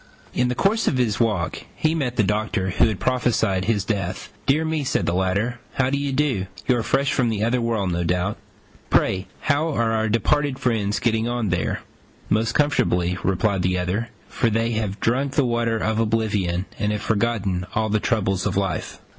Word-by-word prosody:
In 125 - +2
the 125 - -1
course 215 - +1
of 130 - +2
his 110 -5 +1
walk 105 -8 0
he 155 0 +1
met 135 -7 -1
the 110 - +3
Doctor 105 -2 0
who - - +4
had 110 -4 -2
prophesied 115 -7 +1
his 105 -3 +1
death. 95 -4 -3
"Dear 155 +4 +3
me," 160 -2 -1
said 130 - 0
the - - 0
latter, 100 +7 0 0.2
"how 130 0 +1
do 140 - +1
you 140 -1 -1
do? 130 -9 0 0.2
You 125 - +4
are - - 0
fresh 135 +4 +1
from 125 -3 +2
the 110 -2 -1
other 120 +2 +1
world, 110 -5 0
no 85 0 -1
doubt. 90 +1 0 0.5
Pray, 95 0 +2
how 155 +3 +1
are 115 -6 +1
our 110 -1 +1
departed 140 +5 +1
friends 110 -5 0
getting 115 -1 +1
on 120 -3 -1
there?" 90 -2 -1 0.5
"Most 110 +2 +1
comfortably," 90 -11 +2
replied 95 +1 +1
the 90 +1 +1
other, 95 +6 -1 0.2
"for 115 - 0
they 115 +1 0
have 110 -3 -2
drunk 135 +4 0
the 145 -2 +3
water 120 -1 +1
of 110 0 0
oblivion, 105 -5 0
and 105 - +1
have 105 -1 -2
forgotten 100 -5 0
all 110 0 +1
the 110 +1 +2
troubles 100 -4 0
of - - -1
life. 95 -2 -2
110 Hz, 195 wpm, -23 LUFS, 95-125 Hz, 0.5 s, who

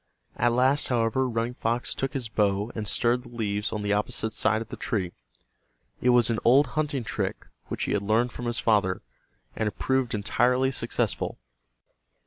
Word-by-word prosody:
At 120 0 +2
last, 130 +4 +3
however, 125 +1 +1
Running 115 +1 -1
Fox 120 0 -1
took 135 0 -3
his 130 -5 -3
bow 105 0 0
and 110 -2 -4
stirred 120 +4 +2
the 125 - -13
leaves 105 -3 -2
on 105 -2 -3
the 105 0 +1
opposite 105 +1 -1
side 110 0 +2
of 115 0 -7
the - - -6
tree. 95 -6 -2 0.9
It 125 - +3
was 120 -2 +5
an 110 - 0
old 135 +5 +6
hunting 145 -1 -1
trick 105 - -3 0.2
which - - -3
he - - -1
had 105 - +1
learned 110 +4 +2
from 120 - -7
his 120 0 -1
father, 100 -4 +2 0.5
and 110 - -1
it 105 - -4
proved 130 -3 0
entirely 125 +5 +2
successful. - - -2
115 Hz, 180 wpm, -27 LUFS, 105-125 Hz, 0.9 s, old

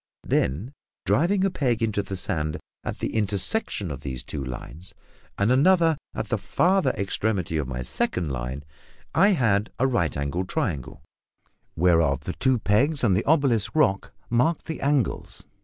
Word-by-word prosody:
Then, 95 - 0 0.3
driving 190 +5 +2
a 195 - +1
peg 120 -8 0
into 105 -2 0
the 95 -1 -5
sand 75 -3 0 0.3
at - - -4
the - - -3
intersection 105 - +1
of 70 - -6
these 65 -3 -5
two 70 - -5
lines, 70 +7 -8 0.4
and 100 +4 +2
another 165 +4 +4 0.2
at - - -4
the - - 0
farther 190 +2 +2
extremity 100 -4 -1
of 75 -4 -2
my 60 -1 -4
second 80 +5 -1
line, 65 +3 -4 0.5
I 200 +1 +5
had 110 - +1
a 130 - +2
right 85 - 0
angled 80 +6 -2
triangle, 70 -8 -3 0.7
whereof 80 -5 +3
the 90 - -4
two 130 -1 +1
pegs 130 +9 +1
and 100 -6 +4
the - - +1
obelisk 135 -7 +2
rock 100 -11 +2 0.2
marked 125 +8 +1
the 160 - -5
angles. 140 -5 -1
100 Hz, 155 wpm, -25 LUFS, -, 0.7 s, I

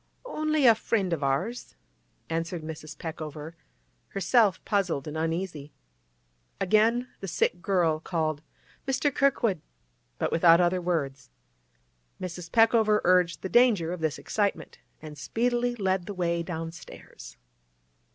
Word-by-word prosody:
'Only 310 - 0
a 235 - +9
friend 200 -4 -1
of 160 - -2
ours,' 140 - -2 0.5
answered 165 +1 -3
Mrs. 155 -1 -8
Peckover, 155 -1 -7 0.5
herself 200 +2 +2
puzzled 185 -9 0
and 150 - -6
uneasy. 160 -2 -3 0.9
Again 225 +5 +2
the 195 - -6
sick 175 0 0
girl 175 -5 +1
called 155 -3 -2 0.5
'Mr. 270 +1 +1
Kirkwood!' 235 - +1 0.6
but - - -1
without 165 0 +6
other 180 +1 +2
words. 140 -7 -2 0.9
Mrs. 175 -2 -7
Peckover 225 -2 +4
urged 180 -1 +2
the - - -1
danger 205 -7 +3
of 180 - -6
this 160 -2 -1
excitement, 200 -7 -2 0.2
and 150 -2 -9
speedily 240 +8 0
led 190 -4 -1
the 205 - -5
way 170 -2 0
downstairs. 165 - -8
175 Hz, 120 wpm, -27 LUFS, 160-215 Hz, 0.9 s, a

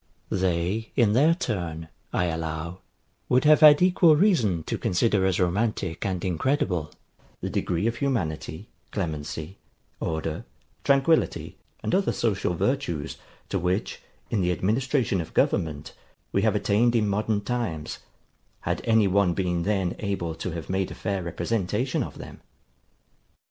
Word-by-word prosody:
They, 95 +4 0
in 115 -5 +4
their 150 +8 +5
turn, 85 - -3 0.2
I 90 - +1
allow, 80 +1 -3 0.5
would 125 +1 +4
have 150 0 +6
had 150 +1 +8
equal 175 -3 +5
reason 125 - +2
to - - -3
consider 95 +1 +2
as 95 - 0
romantic 95 -1 0
and 95 -2 -2
incredible, 90 - 0 0.5
the - - -4
degree 85 +3 -1
of 115 0 0
humanity, 90 - -2 0.2
clemency, 80 -1 -4 0.4
order, 80 0 -3 0.4
tranquillity, 140 +4 +2 0.3
and - - -1
other 195 +1 +2
social 100 -6 0
virtues, 125 - -1 0.3
to - - 0
which, 90 +5 -1 0.3
in 110 - +1
the 90 0 +1
administration 110 - +1
of 80 - -10
government, 75 -3 0 0.4
we - - +2
have - - +2
attained 120 +4 +2
in 110 -2 +2
modern 105 +1 0
times, 105 -10 -3 0.6
had - - -2
any 110 -3 +4
one 95 -2 +2
been 90 -3 0
then 95 -2 0
able 95 -5 -2
to 85 +3 -5
have 85 -2 -6
made 95 0 -1
a - - -8
fair 100 -3 -2
representation 105 +7 -1
of - - -5
them. - - -10
95 Hz, 140 wpm, -26 LUFS, 85-120 Hz, 0.6 s, had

